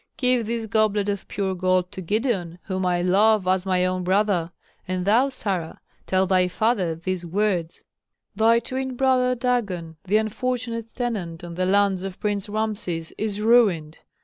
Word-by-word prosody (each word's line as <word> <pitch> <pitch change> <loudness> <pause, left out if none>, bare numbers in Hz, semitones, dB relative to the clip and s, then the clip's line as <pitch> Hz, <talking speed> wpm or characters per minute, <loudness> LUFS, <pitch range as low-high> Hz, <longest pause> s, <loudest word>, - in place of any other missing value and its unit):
Give 250 -3 +1
this 230 0 -2
goblet 210 -1 +1
of 200 -1 -3
pure 195 -2 -2
gold 185 0 +1
to 190 - -7
Gideon, 190 -3 -1
whom 185 -1 -2
I 175 -1 +1
love 200 +2 +3
as 185 0 +1
my 185 -1 +2
own 185 0 -1
brother. 185 -2 +1 0.4
And 185 0 -2
thou, 235 +7 +4
Sarah, 195 -10 -3 0.3
tell 190 0 +2
thy 185 -1 +3
father 185 -3 0
these 180 +2 -4
words: 180 -2 -1 0.5
'Thy 225 +2 +4
twin 260 0 -4
brother 255 -1 +2
Dagon, 200 -10 -2
the 200 +3 +3
unfortunate 230 +1 -3
tenant 195 -9 -3
on 170 -1 -7
the 185 +2 -1
lands 200 -1 +2
of 190 -1 -6
Prince 205 0 -2
Rameses, 205 -6 -3
is 210 -1 -2
ruined. 205 -9 +3
200 Hz, 160 wpm, -24 LUFS, 180-225 Hz, 0.5 s, thou